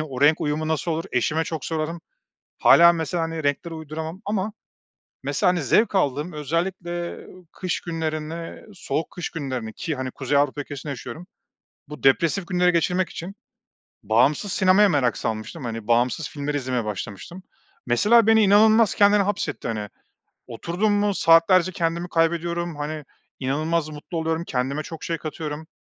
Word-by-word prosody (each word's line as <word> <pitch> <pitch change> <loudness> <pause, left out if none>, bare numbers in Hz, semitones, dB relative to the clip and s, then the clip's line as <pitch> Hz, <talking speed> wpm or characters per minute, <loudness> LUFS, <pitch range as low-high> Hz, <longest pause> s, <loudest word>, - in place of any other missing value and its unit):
Hani, - - -1
o 130 -2 -6
renk 150 +2 +5
uyumu 155 +1 -1
nasıl 160 +1 -1
olur 165 +1 -2
eşime 155 +6 +1
çok 160 -4 -5
sorarım. 165 +1 -3 0.6
Hâlâ 170 0 +7
mesela, 165 +1 -2
hani, 165 -1 -3
renkleri 145 +4 -1
uyduramam. 160 +3 -6
Ama 205 0 -2 0.7
mesela, - - +1
hani, 180 -2 0
zevk 210 - +3
aldığım 150 -1 0
özellikle 170 +3 -3 0.3
kış 185 -3 -3
günlerine, 160 0 -4
soğuk 160 -3 -3
kış 180 - -5
günlerine 130 -8 -4
ki 165 +5 -4
hani 130 0 -4
Kuzey 140 +2 0
Avrupa 145 0 +1
ülkesinde 145 0 -6
yaşıyorum, 140 +6 -7 0.6
bu 150 - -10
depresif 170 +7 +3
günleri 180 -1 +3
geçirmek 180 +2 +1
için 185 +4 -7 0.7
bağımsız 135 - +2
sinemaya 190 +2 +5
merak 130 - +1
salmıştım, 115 +7 -4 0.2
bağımsız 125 +6 +1
filmleri 145 0 -3
izlemeye 125 -4 -2
başlamıştım. 105 - -6 0.4
Mesela 210 - +4
beni 225 0 +5
inanılmaz 215 +2 +5
kendine 205 0 +5
hapsetti. 190 -10 -2
Hani, 105 -2 -3 0.6
oturdum 170 - -1
mu 205 0 +1
saatlerce 170 +2 +5
kendimi 170 +1 -2
kaybediyorum, 170 0 0
hani, 150 0 -5 0.4
inanılmaz 155 +4 0
mutlu 155 +3 -6
oluyorum 160 +1 -1
kendime 140 +1 -2
çok 165 +6 -8
şey 170 -4 -1
katıyorum. 155 0 -6
160 Hz, 145 wpm, -23 LUFS, 145-175 Hz, 0.7 s, Hâlâ